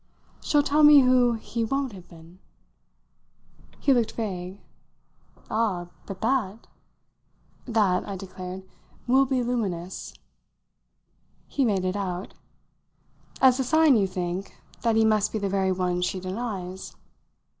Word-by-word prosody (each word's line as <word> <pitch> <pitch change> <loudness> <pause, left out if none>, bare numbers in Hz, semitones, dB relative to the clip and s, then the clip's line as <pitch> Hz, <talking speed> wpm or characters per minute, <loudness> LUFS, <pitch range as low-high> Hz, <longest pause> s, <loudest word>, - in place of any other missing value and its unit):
"She'll 295 -1 +2
tell 295 +2 +2
me 295 -1 +9
who 250 -2 +4
he 230 +1 -4
won't 270 +3 -1
have 185 -3 -12
been!" 170 +1 -16 1.4
He 275 - +3
looked 235 -3 +1
vague. 190 -3 -5 0.9
"Ah, 195 -6 -1 0.2
but 195 -1 -8
that 230 -3 -1 0.5
" - - -37
"That," 190 -4 +2
I 200 - -4
declared, 185 0 -8 0.4
"will 265 +2 +4
be 255 -1 0
luminous." 195 -8 -3 1.3
He 280 - 0
made 200 -6 +1
it 185 +1 -1
out. 185 -2 -4 1.1
"As 260 0 +5
a - - +2
sign, 315 +1 +4
you 200 -3 +2
think, 185 +1 -4 0.3
that 230 -2 +1
he 220 0 +4
must 215 -1 +2
be - - -2
the 200 -2 -2
very 190 -1 +1
one 180 -1 -1
she 185 +1 -1
denies?" 190 -1 -5
205 Hz, 135 wpm, -25 LUFS, 185-245 Hz, 1.4 s, me